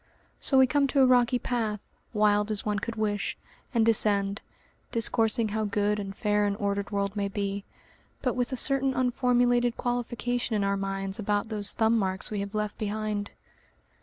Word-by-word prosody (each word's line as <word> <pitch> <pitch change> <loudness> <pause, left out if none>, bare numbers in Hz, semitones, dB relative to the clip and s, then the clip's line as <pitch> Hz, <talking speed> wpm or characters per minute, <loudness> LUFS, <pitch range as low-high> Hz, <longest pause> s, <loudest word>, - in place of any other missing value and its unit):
So 270 - +2
we 265 - +7
come 280 +2 +1
to 275 0 +2
a - - +7
rocky 250 -1 +3
path, 225 -4 -3 0.2
wild 210 -1 +2
as 215 -2 -3
one 210 -1 -1
could 230 +3 -5
wish, 210 -2 -2 0.3
and 230 -3 +2
descend, 205 -2 +3 0.5
discoursing 225 -1 +1
how 215 +1 -2
good 205 0 0
and 195 -1 -6
fair 210 -2 +1
an 200 - -1
ordered 200 -1 -2
world 200 -1 -2
may 200 -1 -1
be, 200 0 -4 0.6
but 250 -3 +1
with 245 0 -1
a 260 - -2
certain 270 +1 +5
unformulated 245 -1 +1
qualification 245 -1 -2
in 205 - 0
our 200 0 +1
minds 195 +1 -3
about 205 0 -1
those 205 -2 +2
thumb 225 0 +2
marks 190 0 -3
we 210 - -2
have 200 +1 -5
left 210 -1 -3
behind. 210 -1 -3
215 Hz, 175 wpm, -27 LUFS, 205-240 Hz, 0.6 s, we